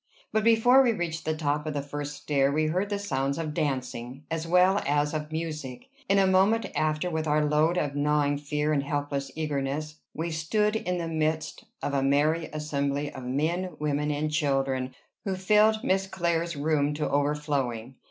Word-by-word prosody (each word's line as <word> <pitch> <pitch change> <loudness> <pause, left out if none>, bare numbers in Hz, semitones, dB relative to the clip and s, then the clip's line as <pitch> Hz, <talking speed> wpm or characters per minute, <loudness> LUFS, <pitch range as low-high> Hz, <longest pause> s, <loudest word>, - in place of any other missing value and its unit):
But 220 -1 +1
before 230 +4 +6
we 245 -3 +3
reached 170 -4 -3
the 155 0 0
top 150 0 -1
of 150 - -3
the 145 - 0
first 145 0 -5
stair 140 -2 +2
we 155 +2 +1
heard 185 +6 0
the 205 - -1
sounds 140 -9 -1
of 155 -2 -3
dancing, 130 -2 -3
as 165 0 -2
well 180 +3 +4
as 145 +1 +1
of 155 0 -4
music. 155 - -5 0.2
In 200 - +4
a 195 - +5
moment 195 +4 +3
after, 155 +2 0
with 160 -1 -2
our 150 0 +2
load 155 +4 +2
of 145 -4 -1
gnawing 145 0 +1
fear 150 +1 -1
and 140 - +2
helpless 145 -1 -2
eagerness, 150 0 -2 0.2
we 165 +2 -2
stood 210 +7 0
in 180 -4 -1
the 170 -1 -3
midst 155 -1 -2 0.2
of 145 - -1
a 140 - +2
merry 150 +4 +2
assembly 145 -1 -2
of 130 -2 -8
men, 160 +7 -1
women, 150 0 -1
and 150 +1 -1
children, 135 -4 0 0.3
who 195 -2 -1
filled 210 +4 +3
Miss 195 -5 +1
Clare's 170 -2 -1
room 145 0 +1
to 150 - -1
overflowing. 140 -4 -1
150 Hz, 180 wpm, -27 LUFS, 145-170 Hz, 0.3 s, before